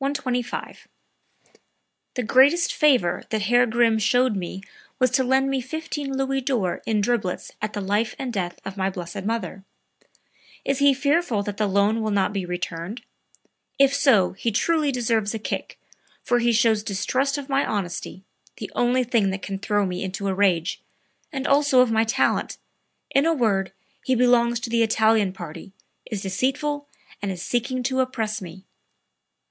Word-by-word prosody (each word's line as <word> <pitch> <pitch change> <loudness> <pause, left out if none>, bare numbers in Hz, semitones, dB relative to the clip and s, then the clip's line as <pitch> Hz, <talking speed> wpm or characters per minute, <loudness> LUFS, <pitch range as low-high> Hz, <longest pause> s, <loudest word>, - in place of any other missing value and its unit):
125. 255 -3 -3 1.3
"The 250 - -1
greatest 280 +9 +4
favor 255 - +3
that 215 -2 -1
Herr 245 +3 +4
Grimm 225 -1 +2
showed 245 +2 +2
me 190 +1 -5 0.3
was 255 -3 +2
to 260 +1 +2
lend 265 +1 +2
me 270 -1 0
15 285 0 -4
Louis 270 0 0
d'Or 245 -9 -1
in 215 -2 +1
driblets 205 -4 -1
at 215 0 -3
the 205 - -3
(life 205 +4 0
and) 255 -3 -4
death 180 -4 -3
of 195 +1 -6
my 190 0 0
blessed 185 +1 -6
mother. 200 -4 -3 1.0
Is 275 0 0
he 280 -1 +5
fearful 280 -5 +1
that 205 0 -5
the 215 - +1
loan 200 +3 +2
will 220 - -1
not 200 -1 +1
be 190 -3 -3
returned? 180 +4 -5 0.7
If 275 -1 +4
so 265 -10 +4
he 215 +5 -2
truly 300 +6 +1
deserves 225 -4 0
a - - -1
kick 215 - -5 0.5
for 245 -1 +2
he 240 0 +2
shows 225 -1 +3
distrust 255 +8 -1
of 280 -2 -6
my 275 0 +1
honesty 190 -1 -4 0.3
(the - - -7
only 250 +1 +2
thing 230 -5 +1
that 190 0 -4
can 195 -1 -4
throw 205 0 +1
me 180 0 -3
into 195 +1 -4
a 195 - 0
rage), 185 -3 +1 0.5
and 270 -3 -4
also 280 -2 +4
of 250 -2 +4
my 225 0 +3
talent....In 275 +5 -1
a 330 - +2
word 200 -8 +1 0.3
he 260 - +1
belongs 240 -1 +3
to 245 - -4
the 235 0 +2
Italian 220 -2 +3
party, 175 +1 -9 0.4
is 210 -4 -4
deceitful 285 +9 -1 0.3
and 200 -1 -2
is 180 -1 -6
seeking 250 +3 -1
to 260 +1 -1
oppress 225 -5 -1
me." 185 +1 -10
230 Hz, 165 wpm, -24 LUFS, 200-260 Hz, 1.3 s, he